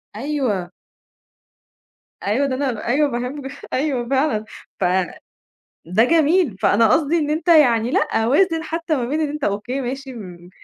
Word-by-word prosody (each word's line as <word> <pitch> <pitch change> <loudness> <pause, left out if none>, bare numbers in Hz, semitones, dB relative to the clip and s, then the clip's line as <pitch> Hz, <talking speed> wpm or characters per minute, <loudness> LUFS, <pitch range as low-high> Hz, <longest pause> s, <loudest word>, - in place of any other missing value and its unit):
أيوه. 230 -9 -2 1.5
أيوه 250 +8 +1
ده 260 - -2
أنا 255 -6 -3
أيوه 285 +4 +2
باحبه 265 +3 -4 0.2
أيوه 260 -3 -1
فعلًا، 265 -6 +1 0.3
ف - - -1 1.0
ده 190 +7 +3
جميل، 320 - +2
فأنا 215 +2 +4
قصدي 320 +2 +2
إن 300 -1 -1
أنت 320 +3 -2
يعني 245 -8 +5
لأ 225 -3 +1
وازن 325 +4 +2
حتّى 330 -1 -2
ما 245 - -1
بين 300 +6 -2
إن 305 - 0
أنت 295 0 -4
أوكي 220 +7 -2
ماشي 265 +1 -5
م 180 -6 -11
265 Hz, 145 wpm, -20 LUFS, 225-300 Hz, 1.5 s, يعني